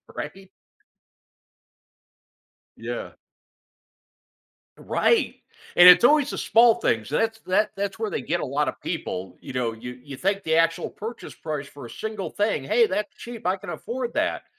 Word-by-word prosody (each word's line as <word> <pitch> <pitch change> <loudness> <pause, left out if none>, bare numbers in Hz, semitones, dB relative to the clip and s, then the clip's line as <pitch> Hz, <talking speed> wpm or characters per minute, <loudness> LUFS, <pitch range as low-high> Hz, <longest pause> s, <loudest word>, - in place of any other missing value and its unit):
right? 190 -1 -7 2.3
Yeah. - - -6 1.6
Right, 465 - +1 0.4
and 175 +1 +9
it's 180 - +9
always 290 +2 +5
the - - -5
small 230 +1 +5
things. 115 - -1
So 150 - 0
that's 225 0 0
that 205 +2 +1
that's 200 +2 -3
where 220 -2 -1
they - - -3
get 175 +2 -1
a - - -2
lotta 145 +3 -1
people, 90 0 -5
you - - -9
know, 120 -3 -1
you 125 +2 -9
you 140 -2 -9
think 195 +1 0
the 160 0 +1
actual 165 +1 +2
purchase 230 +2 -8
price 150 -3 -5
for 140 -3 -11
a - - -9
single 215 - -5
thing, 205 -9 0
"Hey, 225 - +3
that's 205 +2 -2
cheap, 235 -5 -9
I 185 +1 +2
can 185 - -10
afford 235 - -4
that." - - 0
190 Hz, 160 wpm, -24 LUFS, 145-220 Hz, 2.3 s, and